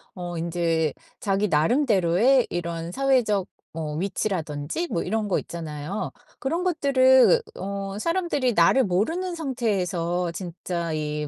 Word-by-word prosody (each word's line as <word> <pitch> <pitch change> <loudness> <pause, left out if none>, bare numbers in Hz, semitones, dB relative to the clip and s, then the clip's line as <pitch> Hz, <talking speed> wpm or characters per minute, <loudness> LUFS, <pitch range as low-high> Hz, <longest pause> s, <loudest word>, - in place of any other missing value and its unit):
어 175 -1 -5
인제 165 -2 0 0.3
자기 200 +1 +1
나름대로의 210 - +3
이런 170 -1 -4
사회적 240 -7 +2 0.2
뭐 155 -2 -4
위치라든지 180 - -2
뭐 165 - 0
이런 215 +2 -1
거 - - +2
있잖아요. 160 +3 -5 0.3
그런 335 +7 -1
것들을 275 - +5
어 195 +1 -4
사람들이 335 - 0
나를 265 +2 +5
모르는 325 - 0
상태에서 180 - -1
진짜 170 -1 -4
이 150 -1 -2
195 Hz, 270 characters per minute, -25 LUFS, 170-260 Hz, 0.3 s, 것들을